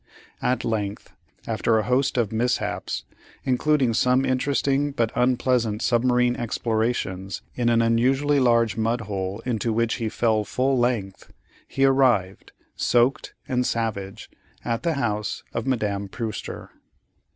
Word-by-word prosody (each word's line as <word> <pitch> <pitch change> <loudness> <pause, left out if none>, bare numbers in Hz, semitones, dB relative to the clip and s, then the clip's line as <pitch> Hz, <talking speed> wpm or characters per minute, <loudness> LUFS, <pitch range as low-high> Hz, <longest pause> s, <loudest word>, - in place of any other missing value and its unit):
At 125 +1 0
length, 105 -3 -3 0.3
after 115 - +1
a 110 - +1
host 130 +4 +1
of 115 -4 +1
mishaps, 120 +3 -1 0.4
including 130 -1 +2
some 125 +3 +3
interesting 140 +2 +1
but 115 -4 0
unpleasant 125 -3 +1
submarine 125 0 +2
explorations 110 -5 -2
in 120 -1 0
an 115 0 +3
unusually 130 +5 +2
large 115 -4 +3
mud 115 +2 0
hole 100 0 -4
into 115 -2 -1
which 115 +1 0
he 115 -3 -2
fell 110 -1 +1
full 130 +5 0
length, 115 -6 -2 0.4
he 135 - +1
arrived, 125 -9 +2 0.2
soaked 120 +2 +1
and 125 -1 +1
savage, 110 -4 -3 0.4
at 115 -1 -1
the 170 -1 0
house 105 -6 -2
of 115 - -3
Madame 100 -6 -1
Prewster. 110 -1 -5
120 Hz, 130 wpm, -24 LUFS, 110-125 Hz, 0.4 s, some